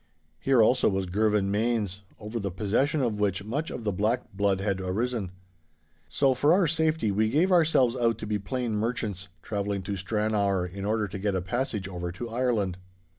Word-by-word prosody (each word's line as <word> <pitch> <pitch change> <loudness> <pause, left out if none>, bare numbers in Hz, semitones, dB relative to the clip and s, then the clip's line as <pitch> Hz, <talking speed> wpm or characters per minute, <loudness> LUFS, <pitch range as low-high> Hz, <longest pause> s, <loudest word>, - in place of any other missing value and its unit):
Here 130 -4 +4
also 125 +3 +4
was 95 -1 -1
Girvan 105 +1 +1
Mains, 105 -3 0 0.2
over 110 +2 -5
the 100 -2 -2
possession 115 - 0
of 110 -4 -1
which 100 -2 0
much 140 +10 -3
of - - -6
the 105 - 0
black 105 +5 -1
blood 100 -1 +1
had 95 -1 -1
arisen. 105 +2 -2 0.8
So, 135 - +3
for 145 +5 +3
our 185 0 +4
safety, 160 -7 +1
we 110 +2 +2
gave 170 +9 +2
ourselves 155 -8 +4
out 115 -2 +1
to - - -6
be 105 -1 -1
plain 120 +3 -3
merchants 105 -4 -2 0.2
travelling 100 -2 -2
to 100 +2 -3
Stranrawer 100 -1 0
in 95 +2 -6
order 105 0 0
to 95 +1 -6
get 100 0 0
a - - +1
passage 105 0 -2
over 90 -2 -4
to 115 +5 -6
Ireland. 115 -7 0
105 Hz, 185 wpm, -27 LUFS, 100-120 Hz, 0.8 s, Here